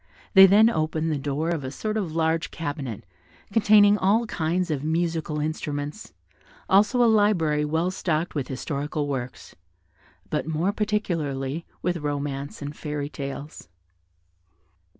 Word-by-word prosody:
They 195 -2 +10
then 210 +4 +6
opened 160 -5 0
the 150 - -1
door 145 +3 -2
of 160 -5 -2
a 130 - -4
sort 215 +10 -4
of 195 -7 -2
large 160 0 +1
cabinet, 145 -9 -5 0.5
containing 210 -1 +5
all 215 +5 +3
kinds 175 -2 -1
of 145 -2 -2
musical 160 -1 -1
instruments, 150 +2 -4 0.6
also 210 +6 +4
a - - +5
library 195 -9 +3
well 160 +4 0
stocked 170 -3 -1
with 140 -4 -3
historical 145 +2 -3
works, 130 -3 -5 0.8
but - - -1
more 160 +5 0
particularly 165 -9 -2 0.2
with 180 -1 0
romances 145 -1 -4
and 145 +1 -6
fairy 150 -1 -4
tales. 140 - -7
160 Hz, 130 wpm, -25 LUFS, 145-190 Hz, 0.8 s, They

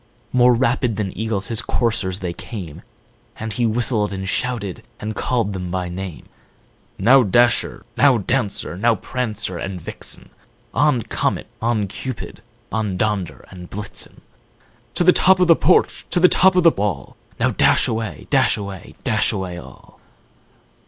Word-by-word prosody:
More 125 -1 +5
rapid 120 -1 +1
than 100 -3 -3
eagles 110 0 -2
his 115 -2 +1
coursers 100 -6 -1
they 90 -2 -3
came, 90 -5 -8 0.6
And 110 -1 -4
he 120 +3 +1
whistled, 110 -2 +1
and 95 -1 -4
shouted, 115 -4 -2 0.2
and 110 0 -4
called 115 -5 0
them 90 -2 -4
by 90 0 -2
name: 90 -1 -6 0.8
ow, 135 +3 +8
Dasher! 120 +1 +2
now, 140 -4 +5
Dancer! 105 -4 -1
now, 115 +5 +2
Prancer 105 -5 -3
and 95 -2 -4
Vixen! - - -6 0.4
On, 145 -6 +2
Comet! - - -1 0.2
on, 115 -2 +1
Cupid! 125 +5 -6 0.3
on, 105 -4 -1
Donder 105 -4 -2
and 90 -1 -10
Blitzen! 105 +1 -5 0.7
To - - +2
the 180 +1 +6
top 190 0 +4
of 180 - +4
the 165 - +7
porch! 180 +4 +2
to - - +1
the 180 - +7
top 185 +1 +4
of 180 - +4
the 165 - +7
wall! 100 - -3 0.2
Now - - +2
dash - - +3
away! 110 -9 -3
dash - - +3
away! 100 0 -8
dash 110 -4 +2
away 95 -4 -4
all!" - - -15
110 Hz, 155 wpm, -21 LUFS, 95-125 Hz, 0.8 s, ow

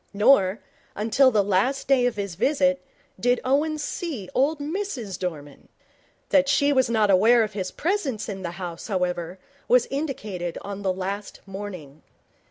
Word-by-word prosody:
Nor, 205 -3 +4 0.4
until 225 +6 +4
the 210 -5 +2
last 205 +8 0
day 255 -2 +4
of 245 - -2
his 200 -3 -4
visit, 275 - +1 0.4
did 245 0 +2
Owen 295 +4 +1
see 295 - -5
old 290 +4 +2
Mrs 285 - -4
Dorman. 150 -6 -6 0.6
That 280 -1 +4
she 285 0 +3
was 260 -3 +2
not 215 -3 +3
unaware 225 +5 +5
of 215 -1 -4
his 190 -2 -3
presence 320 - -2
in 195 -3 -5
the 170 -2 -5
house, 175 -3 -6
however, 180 -3 -2 0.3
was 250 -1 +4
indicated 215 - -4
on 200 0 -6
the 190 -2 +1
last 195 +2 -5
morning. 190 -7 -8
215 Hz, 155 wpm, -24 LUFS, 190-275 Hz, 0.6 s, unaware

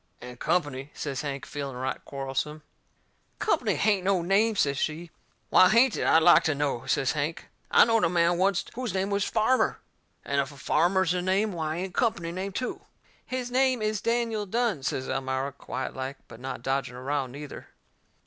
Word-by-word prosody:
"And 125 0 -10
Company," 145 -5 -1
says 140 -3 -3
Hank, 140 -2 -4
feeling 140 -3 -5
right 130 +1 -3
quarrelsome. 140 +3 -4 0.7
"COMPANY 245 - +1
hain't 205 -3 +2
no 190 -2 +2
name," 210 +5 +3
says 140 -8 +1
she. 160 +2 -3 0.4
"WHY 185 - +7
hain't 235 +2 +5
it, - - -1
I'd 160 0 +5
like 175 - +7
to 155 - +1
know?" 140 -4 -2
says 135 -2 +1
Hank. 155 +3 -3 0.2
"I - - +7
knowed 225 -1 +2
a - - +2
man 170 0 +2
oncet 195 -1 +1
whose 240 -5 -4
name 190 +1 0
was 200 0 +1
Farmer, 255 +4 +2 0.5
and 140 0 +1
if 140 +1 -5
a 140 - -14
farmer's 175 +5 +2
a 180 - -1
name 195 +4 +1
why 160 -2 -2
ain't 185 +1 -4
a - - 0
company 180 -8 0
a - - -4
name 190 +3 -4
too?" 250 +6 -4 0.5
"His 255 -1 -3
name 255 -2 +2
is 215 -1 -1
Daniel 230 -3 0
Dunne," 230 - 0
says 130 0 -2
Elmira, 130 +1 -2
quietlike, 130 0 -5
but 115 - -12
not 130 -1 -6
dodging 135 -1 -1
a 125 - -8
row, 140 0 -1
neither. 140 +3 -9
170 Hz, 190 wpm, -27 LUFS, 140-205 Hz, 0.7 s, WHY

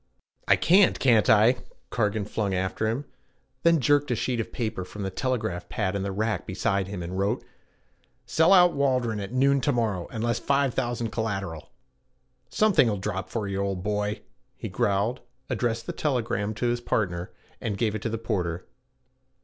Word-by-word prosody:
'I - - +6
can't, 190 +3 +4
can't 115 -5 +4
I!' 110 +4 +6 0.3
Cargan 105 -2 0
flung 100 -2 -2
after 95 +4 -1
him; 120 +6 -2 0.6
then 170 -1 +4
jerked 145 +1 +3
a 125 - +1
sheet 120 0 -1 0.4
from 105 +1 -7
the 95 - -3
telegraph 95 -7 -2
pad 100 -5 -1
in 100 - -1
the 100 0 -2
rack 110 +3 -2
beside 95 0 0
him 95 -3 -5
and 90 +2 -4
wrote: 100 +5 0 0.8
'Sell 160 +3 +3
out 180 -2 +7
Waldron 125 -6 +1
at 100 +1 -5
noon 135 +2 +3
to 145 - +2
morrow 110 -8 -1
unless 115 0 -1
5000 120 -4 0
collateral.' 100 -8 -3 0.8
'Something'll 155 - +3
drop 95 -1 -4
for 110 -3 -3
you, 100 0 -2
old 95 -2 -2
boy,' 105 0 -1 0.4
he - - -5
growled, 100 +5 0 0.3
addressed 115 -2 -1
the - - -4
telegram 115 -7 -1
to 115 - -2
his 120 0 0
partner, 90 -7 -1 0.3
and 105 -3 -2
gave 110 -2 0
it 110 - -4
to 115 - -2
the 115 - -2
porter. 90 -6 -2
110 Hz, 165 wpm, -26 LUFS, 100-125 Hz, 0.8 s, out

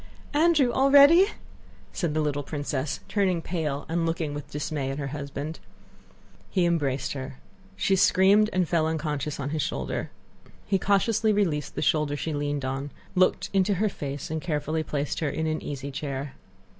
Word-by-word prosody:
"Andrew, 300 -4 +4
already!" 285 +8 +7 0.7
said 165 -5 -2
the 155 - +2
little 145 -1 -1
princess, 145 -1 -3
turning 190 -4 +1
pale 155 -4 -3
and 165 +1 0
looking 165 -2 -1
with 145 -1 -7
dismay 145 -2 -3
at 135 - -3
her 140 -2 -3
husband. 145 +2 -5 0.9
He 185 -3 +2
embraced 140 -6 0
her. 135 -1 -6 0.4
She 145 - +2
screamed 195 +3 +5
and 185 -2 +1
fell 160 -2 +2
unconscious 150 -2 -2
on 140 +1 -3
his 155 -1 -1
shoulder. - - -3 0.6
He 195 -1 +1
cautiously 215 +3 +2
released 170 -9 0
the - - -1
shoulder 150 -2 +1
she 160 +2 -3
leaned 145 -1 -2
on, 135 +2 -3 0.2
looked 185 -1 +2
into 195 +1 +3
her 210 +4 +1
face, 140 -4 -6
and 160 0 -2
carefully 155 -1 -1
placed 145 -2 -2
her 155 - 0
in 160 +3 -2
an 155 0 -1
easy 140 -1 -5
chair. 140 -1 -4
155 Hz, 165 wpm, -26 LUFS, 145-185 Hz, 0.9 s, already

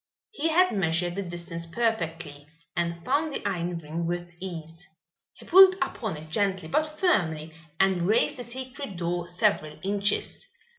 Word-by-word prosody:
He 325 -7 -1
had 360 +3 +4
measured 175 -1 +1
the 200 - -3
distance 170 -2 -5
perfectly 165 -8 -2 0.3
and 170 0 -1
found 295 +4 +1
the 275 - -3
iron 175 -2 -2
ring 165 +1 -4
with 175 0 -4
ease. 165 -2 -8 0.5
He - - -15
pulled 375 +1 +8
upon 240 - -3
it 155 +1 -11
gently 195 -3 0
but 305 - -1
firmly 160 - +1 0.3
and 190 -2 +3
raised 220 +10 +2
the 245 - -5
secret 255 -3 -6
door 175 0 -2
several 175 -4 0
inches. 205 - -1
180 Hz, 150 wpm, -27 LUFS, 170-240 Hz, 0.5 s, pulled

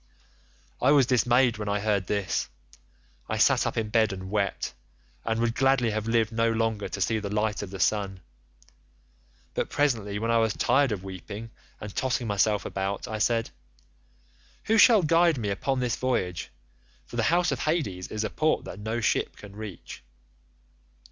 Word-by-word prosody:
"I 130 - +4
was 140 -3 +5
dismayed 120 -1 +3
when 105 -1 -3
I 100 0 0
heard 100 -3 0
this. 100 -2 -1 0.8
I - - -1
sat - - +4
up - - -4
in 110 -2 -1
bed 110 -1 +3
and 95 0 -7
wept, 100 -2 -1 0.5
and 115 0 -1
would 115 0 +1
gladly 135 -2 +2
have 110 +1 -3
lived 115 -1 +2
no 115 0 +1
longer 110 -2 -1
to - - -5
see 110 +4 +1
the 100 -1 -5
light 105 +1 -1
of 100 - -6
the 95 0 -8
sun, 100 -2 0 1.3
but - - -2
presently 115 -8 0
when 115 +2 -1
I 115 - +4
was 110 -2 +2
tired 135 0 +2
of 95 -3 -3
weeping 100 +4 -8 0.3
and 105 -1 -8
tossing 130 -1 0
myself 105 0 +1
about, 100 +4 -3
I 110 -2 -4
said, 115 +1 +1
'And - - -32 1.1
who 225 - +2
shall 220 -4 +7
guide 165 0 +4
me 105 -4 -2
upon 130 +6 -1
this 120 -2 0
voyage—for 85 - -5
the - - +1
house 175 +1 +2
of - - -2
Hades 140 - -1
is 110 0 -3
a - - -3
port 155 0 +1
that - - -8
no 110 +3 -3
ship - - 0
can 100 -1 -12
reach. 105 -5 -8
110 Hz, 175 wpm, -27 LUFS, 100-120 Hz, 1.3 s, shall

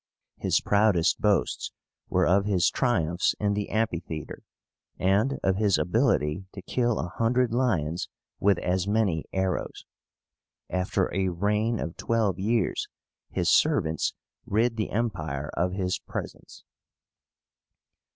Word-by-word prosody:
His - - +2
proudest 100 -4 +2
boasts 105 -2 +1 0.4
were - - +2
of 100 +3 +3
his 95 -4 +2
triumphs 90 - +1
in 105 -1 +1
the 105 0 -2
amphitheatre, 85 -8 -3 0.6
and 100 +9 +2
of 95 0 +2
his 105 -2 +3
ability 95 - +1
to 95 - -9
kill 120 -3 0
a - - -2
hundred 120 +2 +1
lions 90 - 0 0.3
with 100 -2 +3
as 90 +2 -1
many 100 -7 +1
arrows. 95 -1 -2 0.9
After 90 0 0
a 95 0 +1
reign 105 +5 0
of 85 - -5
twelve 110 -5 0
years 110 +4 0 0.4
his - - +1
servants 80 0 +2 0.3
rid 115 +3 +1
the 110 - -2
Empire 80 -11 -2
of 90 +3 0
his 95 -1 -1
presence. - - -8
100 Hz, 120 wpm, -27 LUFS, 90-110 Hz, 0.9 s, of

